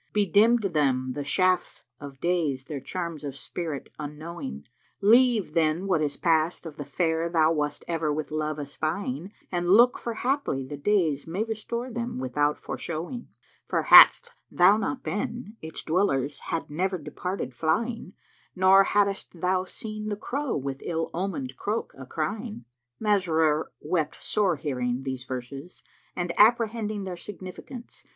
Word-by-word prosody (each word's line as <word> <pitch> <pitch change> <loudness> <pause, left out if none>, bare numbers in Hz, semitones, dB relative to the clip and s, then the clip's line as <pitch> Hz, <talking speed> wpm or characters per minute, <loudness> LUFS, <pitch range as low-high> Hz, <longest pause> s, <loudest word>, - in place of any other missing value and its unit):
* - - -44
Bedimmed 210 +1 +3
them 130 -4 +1
the 145 - -4
Shafts 185 +4 +1 0.2
of 140 -2 -10
Days 155 -7 0
their 145 -1 -5
charms 170 +1 -5
of 140 -2 -5
spirit 155 0 -5
unknowing: 150 - -6 0.4
Leave 225 -4 +4
then 165 +2 +1
what 185 -5 +1
is 145 -2 -1
past 165 +1 +1
of 155 -3 -8
the 145 - -4
Fair 160 +3 0
thou 160 -2 +3
wast 150 -2 -2
ever 165 -3 0
with 150 +1 -3
love 155 0 -2
espying 155 +3 -3
* - - -35
And 175 -1 -1
look; 240 +6 +6
for 235 -1 -4
haply 250 - -1
the 145 - -6
days 160 -3 +1
may 180 +6 -1
restore 230 +3 -4
them 235 - -4
without 145 +4 0
foreshowing: 175 +10 -5 0.4
For - - -1
hadst 480 0 +9 0.2
thou 180 +3 +5
not 255 +5 -2
been, 230 -1 -4
its 160 0 -5
dwellers 145 -6 +1
had 165 - -2
never 185 +5 -1
departed 165 0 -5
flying 205 - -1 0.2
* - - -35
Nor 190 +1 +6
haddest 200 -4 0
thou 185 +1 +1
seen 215 +2 -6
the 205 - -1
Crow 270 +6 -2
with 135 0 -4
ill 165 -1 -2
omened 160 -8 -3
croak 210 - -3
a 130 -1 -10
crying." 205 - -4 0.3
Masrur 160 -7 +2
wept 155 -1 -2
sore 195 -5 +1
hearing 125 -3 -2
these 130 -1 -4
verses 135 +6 -7 0.3
and 175 -1 -2
apprehending 215 -2 +3
their 185 -2 -5
significance. 195 +6 -9
170 Hz, 155 wpm, -26 LUFS, 150-205 Hz, 0.4 s, hadst